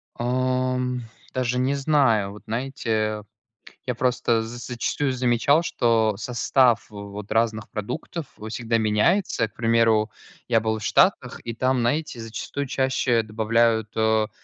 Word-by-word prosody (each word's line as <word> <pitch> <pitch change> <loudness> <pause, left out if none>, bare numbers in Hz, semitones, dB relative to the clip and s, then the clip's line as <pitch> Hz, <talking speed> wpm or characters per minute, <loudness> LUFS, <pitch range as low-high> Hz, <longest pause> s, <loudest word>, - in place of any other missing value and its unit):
Ам, 125 0 0 0.3
даже 125 -1 0
не 130 +2 +1
знаю, 135 -9 +2
вот 105 - -13
знаете, 110 -3 -2 0.6
я 125 - -1
просто 125 -1 +1
за 115 +2 -7
зачастую 125 +3 -2
замечал, 130 +5 +2
что 115 -8 +2
состав 120 +1 +2
вот 100 0 -8
разных 110 -1 0
продуктов 125 +9 -5 0.2
всегда 115 0 -1
меняется. 110 - +2
К - - -32
примеру, 115 -2 +2 0.4
я 115 -2 +3
был 110 0 -1
в 110 - -8
Штатах, - - +2
и 115 - -4
там, 130 +2 +1
знаете, 135 +3 -1
зачастую 115 +5 -5
чаще 130 -3 +1
добавляют, 110 0 +1
о, 110 -1 +2
115 Hz, 130 wpm, -24 LUFS, 110-130 Hz, 0.6 s, я